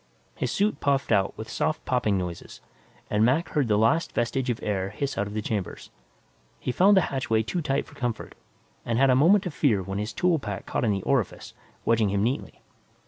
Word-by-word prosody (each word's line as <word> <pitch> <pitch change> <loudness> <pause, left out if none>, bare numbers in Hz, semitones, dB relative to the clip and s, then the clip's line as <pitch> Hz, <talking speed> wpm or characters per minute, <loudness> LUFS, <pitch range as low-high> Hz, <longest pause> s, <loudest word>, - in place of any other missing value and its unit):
His 125 - -3
suit 210 +2 0
puffed 140 -3 0
out 100 -2 +2
with 110 - -7
soft 155 - -2
popping 125 -6 +1
noises 90 -2 -6 0.5
and 105 +1 +3
Mac 135 +9 +2
heard 145 -5 0
the 105 -2 +2
last 115 +10 +2
vestige 125 +2 -1
of 120 - -1
air 95 -2 -1
hiss 135 +7 -3
out 100 - -1
of 105 - -8
the 110 - -2
chamber. 100 -5 -3 0.8
He - - -2
found 195 +8 +5
the - - +6
hatchway 115 -4 +1
too 170 +10 -2
tight 140 -2 -1
for - - -17
comfort 120 -5 -4 0.5
and 115 -1 -1
had 135 +1 +5
a - - +4
moment 185 +9 +5
of 180 - -4
fear 110 -11 +2
when 95 +2 -4
his 105 +2 -3
tool 175 +2 +1
pack 105 -6 -6
caught - - -2
in - - +2
the 95 -2 -2
orifice, 130 -8 -1 0.3
wedging 115 -3 +3
him 100 +1 0
neatly. 125 +5 -3
120 Hz, 210 wpm, -26 LUFS, 105-140 Hz, 0.8 s, the